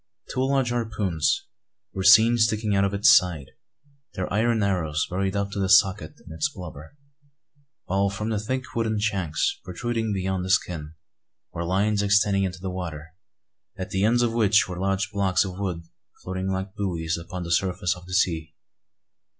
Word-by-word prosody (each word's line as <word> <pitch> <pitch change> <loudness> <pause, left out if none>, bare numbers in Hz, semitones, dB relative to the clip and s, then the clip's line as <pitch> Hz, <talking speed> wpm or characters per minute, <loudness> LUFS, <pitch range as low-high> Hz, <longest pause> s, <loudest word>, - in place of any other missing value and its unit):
Two 130 - -3
large 135 -2 +1
harpoons 105 -9 -1 0.5
were 95 - -3
seen 110 +5 +7
sticking 110 -2 +1
out 100 - +3
of 100 - +1
its 100 - +7
side, 85 -8 +1 0.6
their 95 -1 -3
iron 110 +1 +2
arrows 80 -6 0
buried 95 +2 -2
up 100 0 -1
to 100 - -4
the 95 -1 0
socket 95 -4 +4
in - - -10
its 80 - -1
blubber; 90 - -10 0.9
while 100 +1 +1
from 105 +3 -4
the 110 -2 -1
thick 130 +5 -3
wooden 110 -2 0
shanks, 95 -7 -1
protruding 110 +4 -3
beyond 95 -1 -2
the 95 - -5
skin, 80 -5 -1 0.6
were 85 - -3
lines 100 +4 +1
extending 100 -1 +3
into 95 0 -4
the 95 0 -4
water, 80 -4 -6 0.6
at 95 -1 -6
the 95 +1 0
ends 120 +3 +3
of 115 -1 0
which 105 -2 +3
were 90 -1 -6
large 95 +1 -1
blocks 100 -2 +1
of 95 0 -7
wood 90 -4 -3 0.4
floating 95 0 -4
like 95 0 -3
buoys 85 -6 -2
upon 90 +2 -6
the 85 - -5
surface 90 +1 0
of 90 0 -14
the 90 - -8
sea. 80 -4 0
95 Hz, 175 wpm, -25 LUFS, 90-105 Hz, 0.9 s, seen